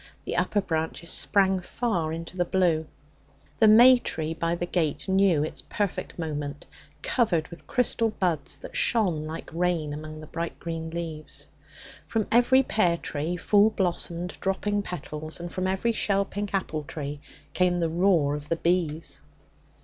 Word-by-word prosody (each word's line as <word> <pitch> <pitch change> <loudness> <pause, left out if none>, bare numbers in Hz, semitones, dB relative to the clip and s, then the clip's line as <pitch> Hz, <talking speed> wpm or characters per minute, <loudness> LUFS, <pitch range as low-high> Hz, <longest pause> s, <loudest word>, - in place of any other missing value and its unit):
The - - -3
upper 205 - +1
branches 165 -1 -2
sprang 190 -1 +3
far 180 -5 -2
into 165 +2 -6
the 180 - +2
blue. 170 -3 +1 0.7
The 220 - +6
may 245 +4 +8
tree 160 -7 -3
by 165 +1 -1
the 175 - -2
gate 170 -2 -1
knew 190 -5 +3
its 155 - -4
perfect 205 -3 -3
moment, 150 -3 -4 0.4
covered 180 -10 +1
with 155 -4 -12
crystal 230 -2 +2
buds 175 -9 -1
that - - -10
shone 180 -10 +2
like 160 +1 -6
rain 170 -3 0
among 155 +1 -7
the 155 - -9
bright 165 +2 -5
green 165 -1 -4
leaves. 160 -2 -5 0.6
From 220 -2 0
every 255 +3 +5
pear 180 -9 +2
tree 160 +3 -3
full 205 +4 +4
blossomed, 175 -3 -2
dropping 205 +2 0
petals 155 -4 -5
and 175 0 -6
from 185 0 -1
every 190 +5 +1
shell 200 -3 +1
pink 205 +1 -4
apple 185 -6 -1
tree 145 0 -5 0.3
came 180 -1 +2
the 165 - +1
roar 165 -4 +2
of 150 0 -6
the 165 - +2
bees. 165 -2 0
175 Hz, 155 wpm, -26 LUFS, 160-195 Hz, 0.7 s, may